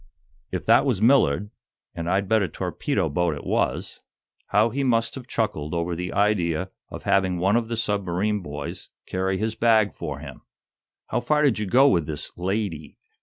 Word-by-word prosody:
If - - -4
that - - +5
was - - +1
Millard 105 - +3 0.4
and 85 0 -4
I'd 95 +2 +1
bet 110 +1 +3
a 100 - +1
torpedo - - -2
boat 85 +1 0
it 75 - -9
was - - -1 0.5
how 105 +3 +3
he 140 +4 -1
must 115 -3 +1
have 130 -2 -8
chuckled 85 -10 -2
over 85 +1 -1
the 90 +1 -4
idea 95 -3 +1 0.2
of - - -8
having 95 -2 +2
one 95 +5 +2
of 115 -1 +1
the 115 0 -3
submarine 105 -1 0
boys 75 -3 -7 0.2
carry 95 +1 -1
his 110 +2 -1
bag 110 -2 +3
for - - -5
him." - - -10 0.7
"How - - 0
far 150 +4 +1
did 135 -7 +3
you 105 - -2
go 130 +8 +5
with 85 - +2
this 75 -2 -5
'lady'?" 90 -5 -3
100 Hz, 180 wpm, -24 LUFS, 90-110 Hz, 0.7 s, that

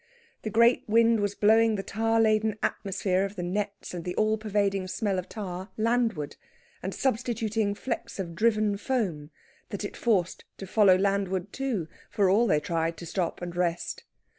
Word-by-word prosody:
The 215 - -3
great 235 +3 +4
wind 230 +1 +4
was 205 -1 -1
blowing 220 +1 +4
the 195 - -3
tar 225 +3 0
laden 215 -1 +2
atmosphere 190 -1 0
of 200 +1 -4
the 180 - -4
nets 200 +2 -3
and 175 -2 -5
the 180 +1 -4
all 215 0 +2
pervading 200 -3 0
smell 195 -1 -1
of 185 - -7
tar 190 -2 -6
landward; 225 -9 0 0.4
and 190 - -3
substituting 225 -4 -1
flecks 235 +2 -4
of 175 -4 -4
driven 215 +1 +2
foam, 195 - -2 0.4
that 200 -1 -5
it - - -6
forced 195 -7 0
to 195 - -7
follow 195 -1 +5
landward 195 -1 0
too, 250 -12 -2 0.2
for 195 -3 +2
all 230 +5 +4
they 150 - +3
tried 165 +1 -1
to 170 - -8
stop 175 0 -2
and 175 -1 -5
rest. 175 -1 -2
200 Hz, 170 wpm, -27 LUFS, 185-220 Hz, 0.4 s, follow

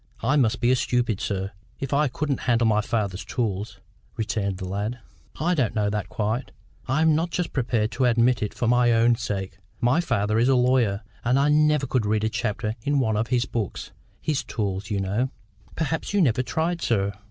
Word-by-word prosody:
"I 145 - +2
must 120 -5 +2
be 120 - +4
a - - +5
stupid, 120 -4 0
sir, 95 -1 -2 0.3
if 135 0 -3
I 150 +2 +3
couldn't 140 +2 -2
handle 120 0 +3
my 105 -1 +3
father's 105 -4 -2
tools," 105 -5 -3 0.4
returned 100 -3 -1
the 95 - -5
lad. 105 +6 -3 0.4
"I 175 +3 +2
don't 130 -10 0
know 105 -1 +1
that 105 -3 -3
quite. 110 +6 -2 0.4
I 145 +5 +2
am 160 -1 +5
not 165 +3 +1
just 175 0 -2
prepared 115 -4 0
to 125 +2 0
admit 120 0 +3
it 105 - -1
for 120 - -2
my 120 0 +4
own 115 +1 +4
sake. 95 -5 -4 0.2
My 125 +8 +3
father 110 -8 0
is 120 +3 +3
a 135 - +5
lawyer, 125 -5 +2 0.2
and 125 +3 +2
I 140 +2 +3
never 150 -1 +3
could 125 -4 0
read 105 0 +1
a 110 - +2
chapter 110 -1 -2
in 145 +5 0
one 110 -4 +1
of 110 +2 0
his 125 -1 +1
books—his 120 - -4
tools, 100 -3 -3
you 100 - -1
know." 100 +7 0 0.5
"Perhaps 160 +5 -2
you 200 - +4
never 125 -4 +2
tried, 160 +8 -1
sir." 100 -3 +1
120 Hz, 200 wpm, -25 LUFS, 105-130 Hz, 0.5 s, a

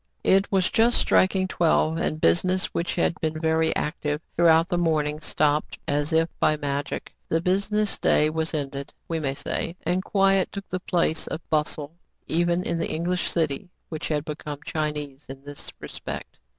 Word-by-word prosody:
It 195 +1 +3
was 190 -2 +2
just 235 +2 +4
striking 190 0 +3
twelve; 165 -2 +2
and 155 -2 -1
business, 185 - +3
which 170 - -1
had 175 0 +1
been 155 -1 -1
very 160 0 +2
active 150 -1 -1 0.2
throughout 165 0 +5
the 175 -2 0
morning, 155 -3 +1
stopped 150 -1 0
as 145 +1 0
if 160 0 +3
by 155 - +3
magic. 145 -1 -3 0.2
The 165 - +2
business 200 +4 +1
day 150 - +4
was. 160 0 -2
ended, 140 -1 -4
we 165 -1 -1
may 135 -3 -1
say; 165 +4 -3
and 180 +3 0
quiet 195 -2 +3
took 200 -1 -7
the 185 - -2
place 170 -3 0
of 160 - -6
bustle, 155 +1 -1 0.3
even 175 +2 +1
in 170 - -1
the 165 - -1
English 175 +3 -1
city, 160 +1 -1 0.2
which 155 -2 -4
had 150 -1 -1
become 150 -1 -6
Chinese 150 -3 -3
in 135 0 -9
this 145 0 -8
respect. - - -7
160 Hz, 170 wpm, -25 LUFS, 150-180 Hz, 0.3 s, throughout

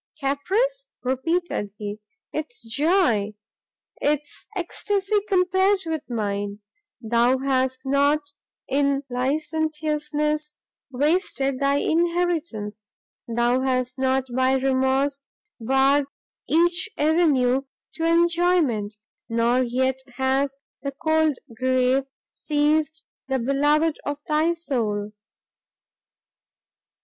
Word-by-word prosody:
"Caprice!" 415 - 0 0.2
repeated 260 - -1
he, 205 0 -5 0.3
"'tis 300 -7 -5
joy! 235 - +2 0.7
'tis 295 0 -1
extacy 390 +3 -1
compared 380 +1 +3
with 315 -3 -4
mine! 205 -3 -2 0.5
Thou 235 +3 +3
hast 260 -1 0
not 285 +2 +2 0.4
in 280 0 +1
licentiousness 300 +2 -1 0.3
wasted 275 -1 0
thy 280 0 +2
inheritance! 320 -11 -1 0.4
thou 240 +2 +1
hast 255 0 -1
not 265 0 +1
by 260 0 +3
remorse 265 +1 +1 0.4
barred 270 +4 +3 0.4
each 345 +6 +2
avenue 290 -5 +3 0.3
to 325 - -4
enjoyment! 335 - +2 0.3
nor 235 +2 +2
yet 260 +1 0 0.2
has 270 +1 0 0.2
the 275 0 -4
cold 315 -1 +1 0.2
grave 255 +1 +2 0.3
seized 310 +1 0 0.2
the 265 -1 0
beloved 290 +5 +2
of 290 0 -3
thy 310 +2 +2
soul!" 220 -11 -2
280 Hz, 90 wpm, -24 LUFS, 255-315 Hz, 0.7 s, compared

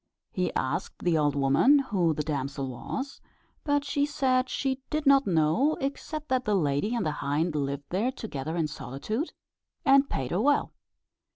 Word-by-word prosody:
He - - -1
asked - - -2
the 175 -2 +2
old 145 -2 +2
woman 140 - +5
who 190 - +1
the 150 - -1
damsel 140 -2 -3
was, 265 - -5 0.4
but 290 -1 +1
she 285 0 0
said 255 -3 +1
she 265 -1 -1
did 305 0 -1
not 275 -2 +5
know, 170 - +2
except 295 +2 -4
that 255 0 +1
the 210 -3 +1
lady 155 - +1
and 235 - -1
the 155 - +1
hind 150 +4 0
lived 140 -1 -2
there 210 +8 0
together 160 - -5
in 160 -2 +1
solitude, 150 - -4 0.5
and 275 0 +5
paid 130 -1 -3
her 180 - +1
well. 285 +3 +2
200 Hz, 170 wpm, -28 LUFS, -, 0.5 s, woman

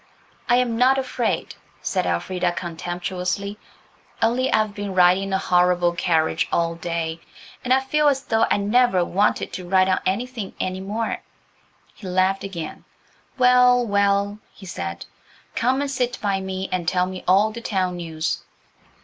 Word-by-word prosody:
"I'm 240 -1 +2
not 260 +2 +5
afraid," 255 -3 -2 0.3
said - - -1
Elfrida 175 - -1
contemptuously; 180 +4 -4 0.6
"only 250 +3 +1
I've 215 -1 +2
been 205 -2 -5
riding 180 +1 +5
in 195 - -4
a - - +3
horrible 180 -1 +2
carriage 165 -2 +1
all 170 0 +1
day, 165 -1 -3 0.4
and 250 - -3
I 265 +1 +5
feel 300 +3 +1
as 275 -1 +2
though 225 -3 +2
I - - +3
never 205 -2 +3
wanted 200 +5 0
to 180 -1 -6
ride 185 0 +4
on 185 - +2
anything 230 +1 -3
any 185 0 -2
more." 215 +4 -3 0.7
He 195 - -10
laughed 185 +1 +1
again. 175 -5 -6 0.5
"Well, 250 -1 +5
well," 200 0 +1
he 195 - -14
said, 85 - -5 0.5
"come 260 +3 +1
and 285 -1 -2
sit 250 -2 -1
by 195 -2 -1
me 190 0 -4
and 180 -2 -2
tell 180 0 +2
me 185 0 -7
all 200 +4 +4
the 235 +2 -8
town 185 -5 -1
news." 160 -2 -3
195 Hz, 155 wpm, -22 LUFS, 180-230 Hz, 0.7 s, not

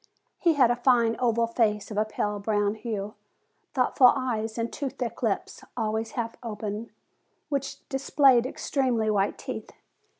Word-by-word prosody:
He 340 -2 +4
had 255 -5 +4
a - - +2
fine, 240 -2 +3
oval 235 -2 +2
face, 220 -3 0
of 210 - -5
a 215 - +2
pale 210 -1 -2
brown 205 0 +1
hue, 215 -2 -4 0.6
thoughtful 255 -1 +5
eyes, 225 -3 -2
and 230 0 -2
two 280 -2 -2
thick 250 -3 -5
lips, 220 -5 -2
always 220 0 -2
half 230 -2 -3
open, 215 -1 -5 0.6
which 275 -2 -3
displayed 270 -2 +4
extremely 250 -6 0
white 200 -1 +1
teeth. - - -6
230 Hz, 145 wpm, -27 LUFS, 215-250 Hz, 0.6 s, thoughtful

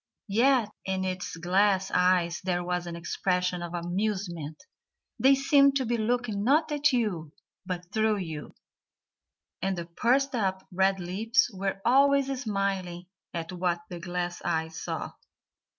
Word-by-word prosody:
Yet 245 -1 +4
in 190 0 -2
its 185 -2 -3
glass 190 +2 +2
eyes 180 -1 +2
there 175 -1 0
was 180 0 -2
an 170 - -5
expression 180 +1 -1
of 175 0 -5
amusement; 175 -3 -3 0.6
they 270 +1 +6
seemed 275 0 +4
to 265 -2 +1
be 240 +1 0
looking 230 -2 -1
not 300 +6 +3
at 295 0 +3
you 185 - -1 0.3
but 180 0 -5
through 220 0 +2
you, 160 -6 -6 1.1
and 190 0 -1
the 170 - -4
pursed 250 +11 +1
up 190 -5 -1
red 190 +1 +2
lips 215 +8 +1
were 195 0 -3
always 275 +1 +4
smiling 195 -5 -2 0.3
at 170 +1 -5
what 175 -1 -1
the 175 - -5
glass 175 0 -3
eyes 160 0 -2
saw. - - -4
190 Hz, 140 wpm, -28 LUFS, 175-230 Hz, 1.1 s, they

